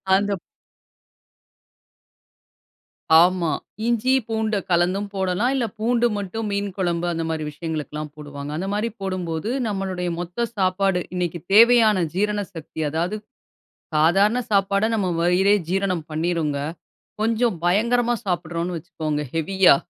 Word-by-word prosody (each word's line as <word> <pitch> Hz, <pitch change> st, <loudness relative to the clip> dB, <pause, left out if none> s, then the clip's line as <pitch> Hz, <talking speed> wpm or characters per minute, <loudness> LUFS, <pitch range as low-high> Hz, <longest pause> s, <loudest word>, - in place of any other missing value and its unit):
அந்தப் 200 Hz, -1 st, 0 dB, 2.8 s
ஆமா. 175 Hz, -2 st, +2 dB, 0.3 s
இஞ்சி, 240 Hz, +2 st, +1 dB, 0.2 s
பூண்ட 220 Hz, -1 st, -1 dB, 0.2 s
கலந்தும் 180 Hz, +4 st, +2 dB
போடலாம். 190 Hz, +5 st, 0 dB
இல்ல, 250 Hz, -, +1 dB
பூண்டு 240 Hz, +2 st, +2 dB
மட்டும் 205 Hz, +3 st, -4 dB
மீன் 200 Hz, 0 st, -1 dB
குழம்பு 175 Hz, -2 st, 0 dB
அந்த 165 Hz, -1 st, -2 dB
மாதிரி 160 Hz, -1 st, -2 dB
விஷயங்களுக்குல்லாம் 150 Hz, -1 st, -5 dB
போடுவாங்க. 145 Hz, -1 st, -7 dB
அந்த 185 Hz, +4 st, -3 dB
மாரி 210 Hz, +3 st, 0 dB
போடும்போது, 185 Hz, 0 st, -3 dB, 0.2 s
நம்மளுடைய 190 Hz, -3 st, -2 dB
மொத்த 175 Hz, +7 st, -2 dB
சாப்பாடு, 190 Hz, -1 st, +1 dB
இன்னைக்கு 175 Hz, -1 st, -2 dB
தேவையான 220 Hz, -3 st, +6 dB
ஜீரண 210 Hz, +1 st, +1 dB
சக்தி, 160 Hz, 0 st, -8 dB
அதாவது 170 Hz, +7 st, -1 dB, 0.8 s
சாதாரண 195 Hz, +9 st, +4 dB
சாப்பாட, 200 Hz, 0 st, +2 dB
நம்ப 195 Hz, -4 st, 0 dB
வயிறே 185 Hz, +4 st, +4 dB
ஜீரணம் 185 Hz, -4 st, -1 dB
பண்ணீருங்க. 160 Hz, -2 st, -1 dB, 0.7 s
கொஞ்சம் 225 Hz, -2 st, +1 dB
பயங்கரமா 235 Hz, +6 st, +2 dB
சாப்பிடுறோன்னு 175 Hz, -1 st, -2 dB
வச்சிக்கோங்க, 155 Hz, -2 st, -3 dB
ஹெவியா 180 Hz, 0 st, +5 dB
185 Hz, 110 wpm, -23 LUFS, 170-210 Hz, 2.8 s, தேவையான